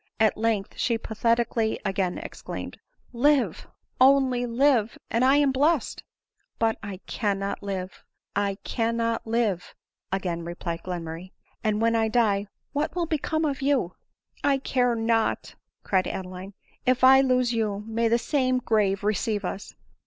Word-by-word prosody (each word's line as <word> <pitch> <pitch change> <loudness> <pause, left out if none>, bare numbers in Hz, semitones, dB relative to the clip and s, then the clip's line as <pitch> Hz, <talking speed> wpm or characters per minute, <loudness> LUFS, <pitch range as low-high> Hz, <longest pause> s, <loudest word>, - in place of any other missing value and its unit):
At 220 -1 +4
length 220 -3 -1
she 235 -2 +1
pathetically 230 0 0
again 190 -2 -1
exclaimed, - - -7 0.2
" - - -35
Lave 290 -4 +2 0.2
— - - -19 0.2
only 250 -2 0
live! 240 -2 +2
and 230 +2 +2
I 265 +2 +5
am 290 -2 +4
blest 290 +2 +1
i" - - -43 0.3
" - - -48
But 225 -1 +1
I 205 -3 -6
cannot 200 -2 -2
live, 190 -2 -5 0.3
I 200 -1 0
cannot 230 -1 -1
live," 220 -6 -1 0.4
again 180 -3 -2
replied 170 0 -5
Glenmurray; 175 0 -6
" - - -39
and 215 0 +1
when 230 0 +3
I 225 -1 +2
die 215 -3 +2 0.3
what 295 +3 -1
will 350 -1 0
become 315 0 -1
of 280 -3 -2
you 270 -10 +1 0.2
?" - - -58
" - - -49
I 280 -1 +3
care 250 -2 +1
not," 225 0 0 0.3
cried 185 -2 +1
Adeline; 185 +1 -6
a - - -7
if 255 0 +2
I 265 +1 +8
lose 255 -2 +2
you, 210 -3 -1
may 230 +1 0
the 230 +1 +3
same 255 +1 +1
grave 210 -5 +1
receive 210 0 0
us 195 +2 -6
225 Hz, 165 wpm, -26 LUFS, 200-255 Hz, 0.4 s, I